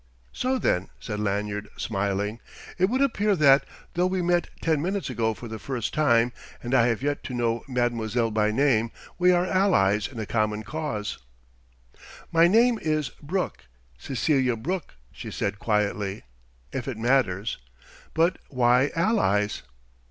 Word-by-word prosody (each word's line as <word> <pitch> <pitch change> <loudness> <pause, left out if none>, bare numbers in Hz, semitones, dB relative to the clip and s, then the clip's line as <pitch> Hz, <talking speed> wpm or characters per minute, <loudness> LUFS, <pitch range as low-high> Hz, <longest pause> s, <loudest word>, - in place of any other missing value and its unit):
So 260 +1 0
then," 95 - 0
said 105 -3 -5
Lanyard, 105 0 -2
smiling, 100 +1 -2 0.4
"it 185 - +5
would 260 +4 +1
appear 210 -6 +2
that, 140 -4 +5 0.3
though 180 +1 +2
we 185 -1 -1
met 175 0 +1
ten 160 -3 +1
minutes 190 -3 -2
ago 110 -2 0
for 120 - -9
the 110 -1 -6
first 125 -3 -3
time 120 -5 +3 0.3
and 120 +2 -3
I 120 -2 +5
have 115 +1 -1
yet 145 0 -1
to 125 - -4
know 115 -1 0
mademoiselle 120 -2 0
by 105 0 +2
name 115 -1 +2 0.3
we 180 0 +5
are 175 0 +3
allies 145 - +2
in 125 -4 -9
a 110 - -3
common 110 0 0
cause." 125 -5 -4 1.1
"My 165 +1 +6
name 230 +4 +4
is 155 -4 0
Brooke 180 +6 -3 0.3
Cecelia 130 - +1
Brooke," 170 - -4 0.2
she - - -8
said 100 0 -3
quietly 105 -2 -1 0.5
"if 125 - -4
it 130 -4 -3
matters. 115 -4 +1 0.6
But 165 +3 +2
why 125 +1 +3
'allies'?" 165 - +1
125 Hz, 150 wpm, -26 LUFS, 110-165 Hz, 1.1 s, My